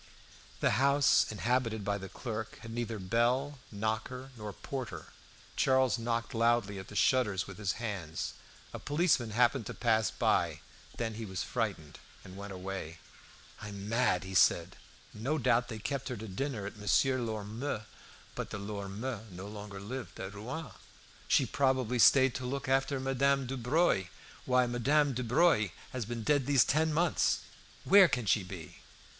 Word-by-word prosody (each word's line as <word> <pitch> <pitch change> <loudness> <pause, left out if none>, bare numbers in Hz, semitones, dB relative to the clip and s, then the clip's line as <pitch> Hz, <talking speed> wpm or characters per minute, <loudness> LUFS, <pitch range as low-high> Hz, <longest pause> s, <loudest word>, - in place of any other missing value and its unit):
The - - +2
house 140 -2 +4
inhabited 115 -1 0
by 100 0 0
the 95 0 -8
clerk 110 -1 -5
had 115 - -8
neither 115 -1 -3
bell, 120 +8 0
knocker, 110 +5 -3
nor 105 -2 -6
porter. 110 - -6 0.5
Charles 130 -2 +3
knocked 115 0 -2
loudly 115 -3 +2
at 95 - -9
the 105 - -11
shutters 105 -4 +2
with 100 -1 -10
his 100 -3 0
hands. 100 -8 -4 0.4
A - - -5
policeman 145 -6 +1
happened 120 +1 +2
to - - -6
pass 110 -2 +2
by. - - +1 0.4
Then 115 -1 -2
he 110 +1 -6
was 95 -2 -3
frightened, 100 - -3 0.3
and 95 - -10
went 100 +1 -7
away. 95 -3 -6 0.6
"I 105 - -6
am 100 0 -7
mad," 115 -5 +2
he 95 0 -7
said; - - +4 0.4
"no 130 +9 -1
doubt 120 -2 +2
they 115 -3 -6
kept 135 +5 -3
her 125 - -4
to 110 +1 -7
dinner 110 +1 -3
at 105 - -7
Monsieur 105 +7 +2
Lormeaux'." 110 +1 -3 0.5
But - - -5
the - - -5
Lormeaux 105 +3 -5
no 95 +1 -8
longer 105 -1 -8
lived 120 +6 -7
at 95 +1 -5
Rouen. 125 +7 -6 0.6
"She - - +4
probably 130 -3 +1
stayed 130 +2 +6
to 130 - -4
look 140 +1 -3
after 135 +1 +1
Madame 135 +1 +1
Dubreuil. 130 - +1 0.4
Why, 125 -1 +3
Madame 135 +4 +2
Dubreuil 125 - +3 0.2
has 125 -4 -3
been 115 0 -5
dead 145 0 +2
these 140 -4 +5
ten 160 +3 +2
months! 165 +1 +2 0.4
Where 195 -1 +8
can 125 -7 -1
she 105 - +3
be?" 90 -4 -9
115 Hz, 160 wpm, -31 LUFS, 105-130 Hz, 0.6 s, Where